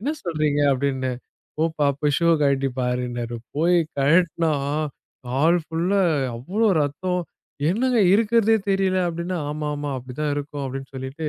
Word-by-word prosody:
"என்ன 285 +8 -1
சொல்றீங்க?" 155 -4 0
அப்படின்னேன் 130 -2 -1 0.4
போப்பா 160 -2 +1
போய் 145 -2 +2
ஷூவ 170 0 +4
கழட்டி 140 -1 +2
பாருன்னாரு. 120 -1 -2 0.2
போய் 170 +4 +3 0.2
கழட்டுனா 165 +3 +3 0.8
கால் 155 +8 +3
ஃபுல்லா 180 +5 +1 0.3
அவ்ளோ 195 - 0 0.2
ரத்தம். 180 +5 -2 0.5
"என்னங்க 240 +4 +2
இருக்குறதே 225 +1 +3
தெரியல?" 195 -1 +2
அப்படின்னா, 170 +2 -3
"ஆமா, 150 0 -3
ஆமா 145 0 -4
அப்படிதான் 130 +4 -3
இருக்கும்" 145 -1 -4
அப்படின்னு 135 0 -6
சொல்லிட்டு 130 +4 -4
150 Hz, 130 wpm, -23 LUFS, 135-180 Hz, 0.8 s, ஷூவ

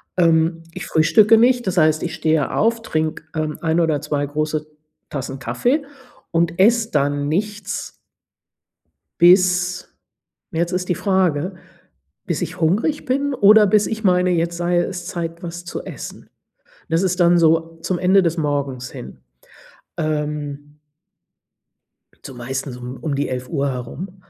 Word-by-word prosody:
Ähm, 165 -1 +2
ich 185 - -6
frühstücke 210 +8 +5
nicht, 245 -1 +3
das 180 -1 -1
heißt, 155 -1 +3
ich 175 - -3
stehe 155 -2 0
auf, 230 +1 +1
trinke, 155 -6 -2
ähm, 155 -1 -2
1 165 +1 +1
oder 160 -3 +1
2 145 -1 -2
große 155 +1 -2 0.4
Tassen 135 -1 -5
Kaffee 280 - 0 0.5
und 170 +1 0
esse 225 +2 +4
dann 145 0 0
nichts 205 +4 -3 1.3
bis 180 0 +4 0.6
jetzt 170 +2 -1
ist 180 0 -2
die 175 - +2
Frage, 185 -2 0 0.7
bis - - -2
ich - - -5
hungrig 210 - +1
bin 275 +2 0
oder 210 -2 +6
bis 210 +1 +3
ich 220 0 -4
meine, 180 -1 +3
jetzt 170 0 0
sei 175 0 0
es 175 0 -2
Zeit, 170 0 -5
was 175 +1 -7
zu - - -6
essen. - - -9 0.6
Das 165 +3 +1
ist 185 -1 0
dann 175 0 +5
so 165 0 +2
zum 180 -2 -1
Ende 190 +1 +4
des 170 0 0
Morgens 140 -4 -2
hin. 65 - -10 0.8
Ähm 150 -2 -4 1.5
so 135 - -8
meistens 130 +2 -5
um 125 +1 -7
um 145 -3 -2
die 145 - -1
11:00 135 +3 -2
herum. 135 +10 -6
170 Hz, 145 wpm, -20 LUFS, 150-185 Hz, 1.5 s, oder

